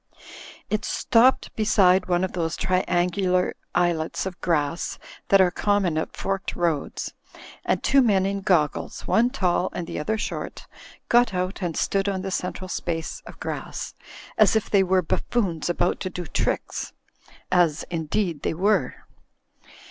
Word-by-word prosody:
It 215 Hz, 0 st, 0 dB
stoppe4 240 Hz, +5 st, +3 dB
beside 190 Hz, -4 st, +4 dB
one 175 Hz, 0 st, +1 dB
of 185 Hz, -, -1 dB
those 165 Hz, -2 st, -1 dB
triangular 185 Hz, 0 st, +1 dB, 0.2 s
islets 175 Hz, -2 st, 0 dB
of 190 Hz, -2 st, -6 dB
grass 165 Hz, -1 st, 0 dB, 0.3 s
that 195 Hz, -, +5 dB
are 185 Hz, -2 st, +5 dB
common 200 Hz, -4 st, +1 dB
at 160 Hz, -, -3 dB
forked 195 Hz, -1 st, -2 dB
roads, 170 Hz, -5 st, -2 dB, 0.5 s
and -, -, 0 dB
two 275 Hz, 0 st, +5 dB
men 200 Hz, -6 st, +3 dB
in 195 Hz, 0 st, -1 dB
goggles, 170 Hz, -7 st, 0 dB
one 235 Hz, +2 st, +3 dB
tall 185 Hz, -7 st, 0 dB
and 175 Hz, -, -4 dB
the -, -, -5 dB
other 220 Hz, +9 st, -1 dB
short, -, -, -5 dB, 0.4 s
got 240 Hz, -4 st, +4 dB
out 185 Hz, +2 st, -2 dB
and 170 Hz, -3 st, -2 dB
stood 195 Hz, 0 st, +1 dB
on 190 Hz, -1 st, -2 dB
the 195 Hz, -, -3 dB
central 185 Hz, +1 st, -3 dB
space 165 Hz, -3 st, -3 dB
of -, -, -11 dB
grass, -, -, -5 dB, 0.5 s
as 215 Hz, -1 st, +6 dB
if 220 Hz, -, 0 dB
they 200 Hz, -, +5 dB
were 185 Hz, -1 st, +2 dB
buffoons 175 Hz, -3 st, -1 dB
about 175 Hz, -, +1 dB
to 185 Hz, -, -3 dB
do 180 Hz, -1 st, -6 dB
tricks. -, -, -2 dB, 0.6 s
As, 175 Hz, -5 st, +3 dB
indeed, 165 Hz, 0 st, -1 dB
they -, -, -1 dB
were. 200 Hz, +5 st, 0 dB
185 Hz, 150 wpm, -24 LUFS, 175-200 Hz, 0.6 s, as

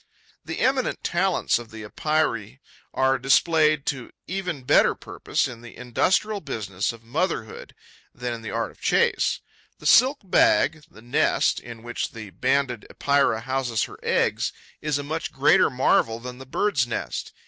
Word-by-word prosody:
The -, -, -5 dB
eminent 260 Hz, -1 st, +1 dB
talents 180 Hz, -6 st, +1 dB
of 120 Hz, -2 st, -10 dB
the 110 Hz, -1 st, -9 dB
Epeirae 135 Hz, -2 st, -1 dB, 0.3 s
are 130 Hz, 0 st, +2 dB
displayed 155 Hz, +2 st, +3 dB
to 135 Hz, -4 st, -3 dB, 0.2 s
even 180 Hz, -7 st, -4 dB
better -, -, +4 dB
purpose -, -, -2 dB
in 120 Hz, -2 st, -9 dB
the 120 Hz, -1 st, -12 dB
industrial 190 Hz, -, 0 dB
business 105 Hz, -, -3 dB
of 115 Hz, -1 st, -14 dB
motherhood 120 Hz, -, -3 dB, 0.4 s
than 125 Hz, -1 st, -4 dB
in 115 Hz, -, -7 dB
the 110 Hz, -, -6 dB
art -, -, -2 dB
of -, -, -23 dB
the -, -, -28 dB
chase. -, -, +2 dB, 0.4 s
The -, -, -15 dB
silk 265 Hz, +4 st, +6 dB
bag, 185 Hz, -, +3 dB
the 110 Hz, -, -16 dB
nest, 120 Hz, -, +2 dB
in 115 Hz, -2 st, -11 dB
which 120 Hz, 0 st, -4 dB
the 110 Hz, -3 st, -9 dB
Banded 125 Hz, +3 st, 0 dB
Epeira 140 Hz, -6 st, +1 dB
houses 125 Hz, -3 st, -1 dB
her -, -, -8 dB
eggs, -, -, +1 dB, 0.3 s
is 150 Hz, -2 st, 0 dB
a 145 Hz, -, -4 dB
much 160 Hz, +3 st, -4 dB
greater 135 Hz, +3 st, +4 dB
marvel 125 Hz, -3 st, +2 dB
than 125 Hz, +1 st, -8 dB
the 130 Hz, -, -10 dB
bird's 135 Hz, -4 st, +1 dB
nest. 120 Hz, -, -4 dB
130 Hz, 160 wpm, -24 LUFS, 115-155 Hz, 0.4 s, silk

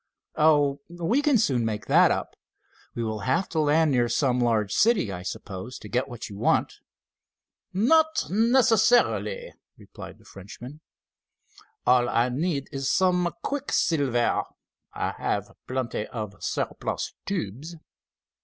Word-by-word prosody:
"Oh, 145 Hz, -2 st, +3 dB
we 175 Hz, +10 st, 0 dB
can 290 Hz, -3 st, +3 dB
soon 135 Hz, -, +1 dB
make 110 Hz, -1 st, -3 dB
that -, -, +5 dB
up. -, -, -2 dB, 0.6 s
We 120 Hz, -, -2 dB
will 110 Hz, -1 st, -3 dB
have 165 Hz, -, 0 dB
to 160 Hz, -, -2 dB
land 155 Hz, +1 st, +3 dB
near 120 Hz, -2 st, +2 dB
some 125 Hz, 0 st, +1 dB
large 110 Hz, -4 st, +1 dB
city, 215 Hz, -, +3 dB
I 90 Hz, -1 st, -6 dB
suppose, 95 Hz, +4 st, -7 dB
to -, -, -11 dB
get 125 Hz, +2 st, -1 dB
what 120 Hz, -1 st, -7 dB
you 100 Hz, -2 st, -10 dB
want." -, -, +1 dB, 0.9 s
"Not 315 Hz, -, +3 dB
necessarily," 240 Hz, -, +3 dB, 0.2 s
replied -, -, -11 dB
the -, -, -23 dB
Frenchman. 120 Hz, +9 st, -11 dB, 1.0 s
"All 125 Hz, -1 st, +4 dB
I 120 Hz, +2 st, +2 dB
need 140 Hz, +2 st, -2 dB
is 135 Hz, -2 st, -2 dB
some 180 Hz, 0 st, +2 dB
quicksilver. 145 Hz, -, 0 dB, 0.5 s
I -, -, -2 dB
have -, -, -2 dB, 0.2 s
plenty 130 Hz, -4 st, -3 dB
of 105 Hz, -4 st, -6 dB
surplus -, -, -3 dB
tubes." 155 Hz, -, -4 dB
140 Hz, 130 wpm, -26 LUFS, 120-185 Hz, 1.0 s, that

